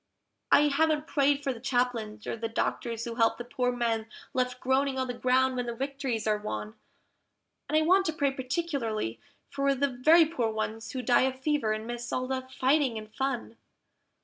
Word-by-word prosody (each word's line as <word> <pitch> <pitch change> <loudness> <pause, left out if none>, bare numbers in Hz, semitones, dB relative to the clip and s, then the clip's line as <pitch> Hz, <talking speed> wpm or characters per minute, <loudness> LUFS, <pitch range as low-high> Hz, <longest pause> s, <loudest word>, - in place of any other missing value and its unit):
I - - +7
haven't 305 +1 +2
prayed 285 -1 +2
for 270 - 0
the 235 - -10
Chaplains, 240 -4 -1
or - - -2
the 230 0 -3
Doctors 230 0 -2
who 235 - -4
help 225 -2 +3
the 240 - -5
poor 250 +1 -1
men 230 -2 -1 0.3
left 250 -1 -1
groaning 265 +1 +1
on 260 - 0
the 250 - -4
ground 255 +1 +2
when 245 -1 -2
the 235 - -3
victories 270 -3 -3
are 210 -1 +1
won; 105 - -5 1.0
And 310 - +3
I - - +4
want 375 +3 +4
to 320 - 0
pray 285 -3 +1
particularly 255 - -2 0.3
for 275 0 +1
the 280 +2 +1
very 310 +7 +5
poor 300 -8 -1
ones 220 +2 -4
who 255 -1 -3
die 245 +2 +4
of 260 - -15
fever 285 -5 0
and 215 0 -2
miss 240 0 -5
all 255 - -1
the 260 0 -2
fighting 260 -2 +2
and 215 0 -9
fun. 265 -4 -3
255 Hz, 195 wpm, -29 LUFS, 230-275 Hz, 1.0 s, I